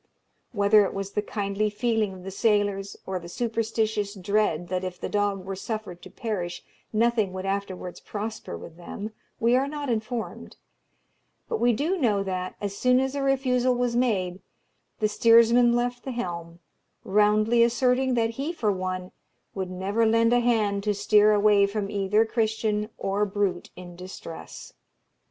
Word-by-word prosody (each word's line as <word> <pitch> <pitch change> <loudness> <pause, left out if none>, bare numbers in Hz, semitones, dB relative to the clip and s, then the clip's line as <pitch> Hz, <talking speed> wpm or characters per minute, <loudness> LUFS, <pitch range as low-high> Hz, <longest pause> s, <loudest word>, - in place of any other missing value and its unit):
Whether 205 -1 +5
it 195 - -3
was 195 0 -4
the 210 - 0
kindly 205 0 -1
feeling 220 -1 0
of 185 - -12
the 195 - -6
sailors, 205 -1 0
or 190 -1 -3
the 170 0 -10
superstitious 220 -1 -1
dread 190 -3 0
that 185 0 -1
if 185 -1 -5
the - - -3
dog 205 -2 0
were 195 0 -4
suffered 195 -3 -5
to - - -11
perish 180 -7 -4 0.3
nothing 220 -3 +1
would 185 0 -5
afterwards 195 -2 -4
prosper 215 - -6
with 160 - -11
them, 200 +5 -7 0.3
we 235 +2 +3
are 265 +2 +2
not 290 -1 -4
informed; 225 +1 -4 0.9
but 455 - -2
we 240 - +4
do 305 - 0
know 210 -8 +2
that, 185 -1 -4
as 200 -1 -4
soon 250 +3 +3
as 265 0 -1
a 285 - -2
refusal 255 -2 +2
was 245 -1 0
made, 195 -7 0 0.6
the 215 - +2
steersman 235 +2 +5
left 245 0 -1
the 265 - -4
helm, 170 -7 -5 0.5
roundly 210 +3 +3
asserting 250 +2 +2
that 225 -1 +1
he 275 +7 -3
for 230 -11 0
one 185 -1 -3 0.4
would 190 -2 -4
never 195 +5 0
lend 230 +1 +3
a 245 - +5
hand 215 -4 +1
to 210 -1 0
steer 210 +1 +4
away 205 -1 +4
from 200 0 -3
either 205 +2 +2
Christian 220 -2 0
or 195 +1 0
brute 200 -3 -1
in 175 -1 -10
distress. 180 -2 -9
210 Hz, 165 wpm, -26 LUFS, 195-235 Hz, 0.9 s, Whether